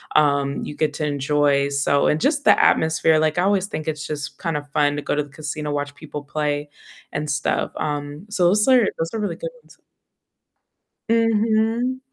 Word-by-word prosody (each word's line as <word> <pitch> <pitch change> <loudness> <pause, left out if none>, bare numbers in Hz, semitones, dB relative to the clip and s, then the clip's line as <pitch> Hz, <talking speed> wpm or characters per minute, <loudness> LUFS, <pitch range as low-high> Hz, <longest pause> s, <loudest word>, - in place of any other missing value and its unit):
um, 140 -2 +2
you - - -6
get 155 0 -1
to 150 - -3
enjoy, 145 0 +1
so 140 0 +1
and 150 - +1
just 285 -1 +1
the 205 - +6
atmosphere, 160 0 +3
like 155 +2 +1
I - - +3
always 195 0 +2
think 155 -5 -6
it's 150 -1 -3
just 150 -1 -5
kind 165 -4 -3
of 145 0 -8
fun 145 -1 +2
to 145 - -3
go - - -1
to 150 - 0
the 145 - -14
casino, 150 +1 -5
watch 145 0 -3
people 150 -1 -8
play 145 0 -2 0.4
and 150 +1 -3
stuff. 145 +1 -1
Um, 145 +4 -4
so 200 -3 0
those 210 +7 +3
are 250 -5 +5
those 165 0 -2
are 220 - -2
really 205 - -2
good - - -5
ones. - - -20 1.3
Mhm. 225 +2 +2
150 Hz, 195 wpm, -22 LUFS, 145-200 Hz, 1.3 s, the